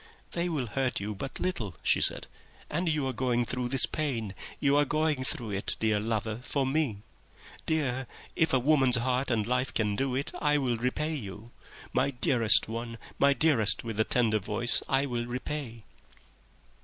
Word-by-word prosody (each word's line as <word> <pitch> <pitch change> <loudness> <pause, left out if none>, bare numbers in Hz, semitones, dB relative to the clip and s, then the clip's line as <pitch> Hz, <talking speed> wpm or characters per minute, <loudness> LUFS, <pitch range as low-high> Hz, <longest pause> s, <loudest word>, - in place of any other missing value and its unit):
"They 175 +1 -1
will 150 -7 -1
hurt 130 +3 -1
you 105 +2 -3
but 120 +7 -6
little," 110 - -2
she - - +3
said; - - +1 0.5
"and 170 +3 0
you 150 -3 0
are 130 - -1
going 120 -1 0
through 125 +2 -2
this 135 0 +6
pain, 120 -10 -3 0.3
you 140 -1 +3
are 145 - +5
going 150 -1 0
through 120 -4 -3
it, 100 0 0
dear 110 -2 +2
lover, 110 0 -2
for 135 +1 -1
me.... 130 -7 -1 0.6
Dear, 135 -5 0 0.3
if 160 -2 +2
a 130 - +4
woman's 135 -1 +4
heart 125 +2 0
and 110 -4 +1
life 125 +2 0
can 105 -2 0
do 135 +2 -1
it, 140 +2 -2
I 150 -1 +3
will 125 -4 0
repay 140 +7 -1
you. 110 -3 -7 0.4
My - - +2
dearest 115 -5 +4
one, 115 +1 -5 0.2
my 140 0 +5
dearest 135 -8 +2
with 115 -3 -5
the 110 - +4
tender 110 -2 +1
voice, 105 +4 -1
I 135 +1 +2
will 120 -3 -3
repay." 125 -2 -5
125 Hz, 180 wpm, -29 LUFS, 115-140 Hz, 0.6 s, this